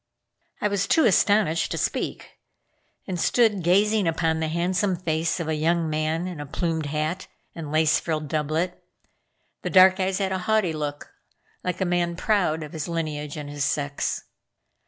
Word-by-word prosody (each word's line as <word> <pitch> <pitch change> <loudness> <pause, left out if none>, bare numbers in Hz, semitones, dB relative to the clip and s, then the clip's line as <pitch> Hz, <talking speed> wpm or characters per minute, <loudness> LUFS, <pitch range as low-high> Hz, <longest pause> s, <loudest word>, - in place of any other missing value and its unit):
I - - +2
was 200 -1 0
too 320 - +4
astonished 205 -5 +3
to - - -3
speak - - -3 0.7
and 185 -3 -4
stood 220 0 +3
gazing 200 +3 +3
upon 165 -1 +1
the 160 - -1
handsome 180 +4 0
face 165 -1 -1
of 165 - -3
a 160 - 0
young 160 +1 +1
man 155 +2 -1
in 180 -4 -6
a 145 - -5
plumed 160 0 -2
hat 155 +5 -2 0.3
and 155 -3 -7
lace 155 0 +3
frilled 155 -2 -3
doublet. 155 +4 -2 0.8
The - - -3
dark 185 0 +6
eyes 190 0 0
had 195 -2 -1
a 190 - -1
haughty 210 -3 +1
look, 145 -1 -5 0.5
like 180 +1 -3
a - - +2
man 175 -1 0
proud 180 -5 +1
of 150 - -9
his 155 -2 -4
lineage 155 -3 -3
and 150 -1 -6
his 145 0 -3
sex. 140 0 -1
165 Hz, 170 wpm, -25 LUFS, 155-185 Hz, 0.8 s, dark